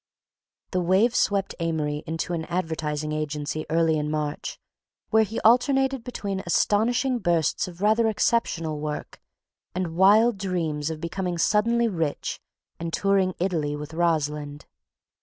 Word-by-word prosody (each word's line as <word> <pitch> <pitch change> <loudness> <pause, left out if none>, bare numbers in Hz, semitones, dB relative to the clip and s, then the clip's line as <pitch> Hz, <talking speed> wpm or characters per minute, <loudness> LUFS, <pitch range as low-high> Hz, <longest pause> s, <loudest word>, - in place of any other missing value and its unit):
The 185 - 0
wave 190 +7 +3
swept 200 -4 +1
Amory 155 -3 -1
into 165 +2 -3
an 160 -1 -2
advertising 160 -3 -2
agency 150 0 -3
early 160 -1 +2
in 150 0 -2
March, 150 -1 -3 0.5
where 220 0 +5
he 220 +1 -1
alternated 265 +2 +3
between 200 -6 -4
astonishing 240 +8 +2
bursts 170 -5 +1
of 180 0 -11
rather 220 +2 +4
exceptional 175 -8 0
work 150 0 -5 0.5
and 180 -3 -2
wild 205 +4 +5
dreams 165 -6 -2
of 160 -1 -5
becoming 175 +1 -3
suddenly 230 +6 +2
rich 165 -8 -2 0.4
and 165 0 -4
touring 195 0 +1
Italy 160 -5 -1
with 150 +2 -7
Rosalind. 150 -3 -1
170 Hz, 130 wpm, -25 LUFS, 155-205 Hz, 0.5 s, where